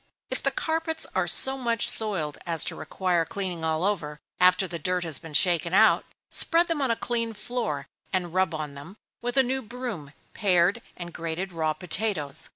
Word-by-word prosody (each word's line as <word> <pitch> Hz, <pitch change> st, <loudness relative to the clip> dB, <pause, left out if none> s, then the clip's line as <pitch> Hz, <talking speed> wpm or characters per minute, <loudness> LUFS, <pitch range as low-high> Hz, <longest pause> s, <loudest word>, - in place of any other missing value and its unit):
If -, -, -3 dB
the -, -, +1 dB
carpets 320 Hz, 0 st, -1 dB
are -, -, 0 dB
so 265 Hz, 0 st, +3 dB
much 235 Hz, -2 st, +2 dB
soiled 190 Hz, -10 st, +2 dB
as 165 Hz, -3 st, +2 dB
to -, -, -2 dB
require 180 Hz, -3 st, -1 dB
cleaning 180 Hz, -2 st, -5 dB
all 160 Hz, +1 st, 0 dB
over, 165 Hz, -7 st, -2 dB, 0.2 s
after 185 Hz, +1 st, +4 dB
the 170 Hz, -1 st, -5 dB
dirt 180 Hz, +3 st, -1 dB
has 160 Hz, -5 st, +2 dB
been 160 Hz, -2 st, -10 dB
shaken 175 Hz, +1 st, +2 dB
out, 220 Hz, +2 st, +5 dB, 0.3 s
spread 335 Hz, +1 st, +6 dB
them 325 Hz, -3 st, -1 dB
on 265 Hz, -, 0 dB
a 230 Hz, -, +2 dB
clean 230 Hz, -1 st, -2 dB
floor, 205 Hz, -, -3 dB, 0.3 s
and 180 Hz, -3 st, -2 dB
rub 185 Hz, -3 st, +1 dB
on 150 Hz, -2 st, -5 dB
them, 145 Hz, +9 st, -11 dB, 0.2 s
with 245 Hz, +2 st, -3 dB
a 265 Hz, -, +7 dB
new 260 Hz, +1 st, -1 dB
broom, 230 Hz, -, -7 dB, 0.2 s
pared 190 Hz, +2 st, +2 dB, 0.2 s
and 175 Hz, -1 st, -8 dB
grated 170 Hz, +3 st, -4 dB
raw 160 Hz, -2 st, -1 dB
potatoes. 160 Hz, -4 st, -1 dB
185 Hz, 185 wpm, -26 LUFS, 160-230 Hz, 0.3 s, a